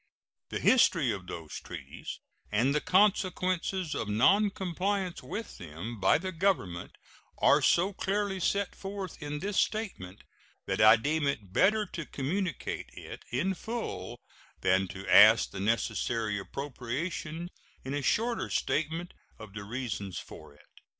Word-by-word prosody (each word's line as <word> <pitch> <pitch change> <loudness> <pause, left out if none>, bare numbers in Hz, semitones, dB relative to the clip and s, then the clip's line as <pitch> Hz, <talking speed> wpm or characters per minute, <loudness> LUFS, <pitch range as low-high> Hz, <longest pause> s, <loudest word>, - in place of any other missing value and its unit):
The - - -3
history 170 - +4
of 95 -3 -5
those 80 -4 -7
treaties - - -8 0.3
and 120 +7 +2
the 150 - +1
consequences 185 -3 +1
of 105 - -3
noncompliance 190 - +1
with 225 +1 -6
them 90 +8 -7
by 95 +8 +4
the 185 +4 -4
Government 160 - -1 0.4
are - - +5
so 185 +4 +3
clearly 195 0 -1
set 200 +2 0
forth 195 -3 -6
in 150 0 -4
this 200 +1 0
statement 145 - -2 0.4
that - - -1
I 110 +1 +9
deem 145 +6 0
it 105 -9 -3
better 215 - +4
to 165 -5 -7
communicate 170 +4 -3
it - - -9
in 170 +11 0
full 150 - -5 0.4
than 95 +1 +3
to 95 +2 -8
ask 110 +2 +7
the - - -6
necessary 110 0 0
appropriation 145 - -4 0.3
in 135 - -3
a 145 - -1
shorter 230 - 0
statement 160 +3 -1 0.2
of 110 -3 -11
the 100 -1 -6
reasons 105 -6 -4
for - - -10
it. - - -22
150 Hz, 135 wpm, -30 LUFS, -, 0.4 s, I